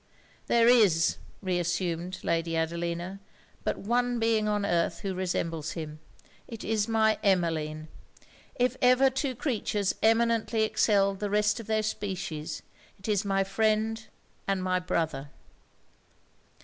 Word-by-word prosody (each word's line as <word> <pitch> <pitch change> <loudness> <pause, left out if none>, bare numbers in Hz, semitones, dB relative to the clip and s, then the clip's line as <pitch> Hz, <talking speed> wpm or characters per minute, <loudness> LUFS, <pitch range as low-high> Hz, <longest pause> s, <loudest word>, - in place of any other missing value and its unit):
'There 235 -1 +4
is,' 205 -10 +4 0.3
reassumed 175 0 -1
Lady 165 0 0
Adelina, 170 +3 -2 0.4
'but - - -1
one 245 +3 0
being 225 -2 +2
on 210 -1 0
earth 170 -3 0
who 195 -1 -3
resembles 170 -4 -2
him: 155 -2 -6 0.5
it 230 -2 -8
is 215 -1 0
my 220 -1 +2
Emmeline! 160 -5 0 0.7
If 250 +1 +1
ever 255 +1 +5
two 265 0 -2
creatures 215 -6 -1
eminently 225 0 +2
excelled 200 -3 +2
the 205 - -2
rest 210 +2 +2
of 225 - -9
their 220 0 +1
species, 175 -7 -4 0.3
it 190 - -10
is 210 -1 +1
my 195 -1 +1
friend 220 +2 0 0.4
and 195 -1 0
my 185 0 +1
brother!' 160 -6 -2
195 Hz, 125 wpm, -28 LUFS, 170-220 Hz, 0.7 s, ever